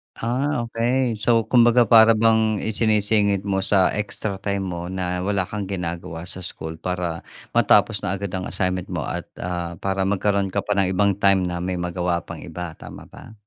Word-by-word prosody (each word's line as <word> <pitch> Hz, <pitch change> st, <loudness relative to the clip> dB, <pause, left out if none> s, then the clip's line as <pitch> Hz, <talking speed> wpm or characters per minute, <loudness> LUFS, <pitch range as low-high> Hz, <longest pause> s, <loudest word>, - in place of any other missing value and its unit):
Ah, 130 Hz, +4 st, -1 dB
okey. 120 Hz, 0 st, 0 dB
So, 115 Hz, +2 st, +3 dB
kumbaga, 120 Hz, -2 st, +5 dB
para 115 Hz, 0 st, +8 dB
bang 110 Hz, -1 st, +2 dB
isinisingit 105 Hz, -2 st, +1 dB
mo 95 Hz, -1 st, -1 dB
sa 95 Hz, -2 st, +3 dB
extra 105 Hz, -1 st, -3 dB
time 100 Hz, 0 st, -2 dB
mo 85 Hz, -2 st, -4 dB
na 90 Hz, 0 st, -3 dB
wala 100 Hz, -1 st, +1 dB
kang 100 Hz, +2 st, -4 dB
ginagawa 85 Hz, -3 st, -5 dB
sa -, -, -5 dB
school 80 Hz, -2 st, -7 dB
para 90 Hz, -1 st, -4 dB, 0.2 s
matapos 105 Hz, +1 st, +4 dB
na 95 Hz, -, -1 dB
agad 100 Hz, 0 st, -4 dB
ang 90 Hz, 0 st, -4 dB
assignment 90 Hz, -1 st, -2 dB
mo, -, -, -2 dB
at, -, -, -4 dB, 0.2 s
ah, 85 Hz, -1 st, -3 dB
para 95 Hz, 0 st, 0 dB
magkaroon 100 Hz, -1 st, 0 dB
ka 100 Hz, -, +1 dB
pa 105 Hz, 0 st, -2 dB
ng 95 Hz, -1 st, +2 dB
ibang 100 Hz, 0 st, +2 dB
time 100 Hz, -1 st, +3 dB
na 90 Hz, -1 st, -2 dB
may 90 Hz, 0 st, -3 dB
magawa 90 Hz, 0 st, -1 dB
pang -, -, -9 dB
iba, 90 Hz, -2 st, -7 dB
tama -, -, -11 dB
ba? -, -, -13 dB
100 Hz, 185 wpm, -22 LUFS, 90-110 Hz, 0.2 s, para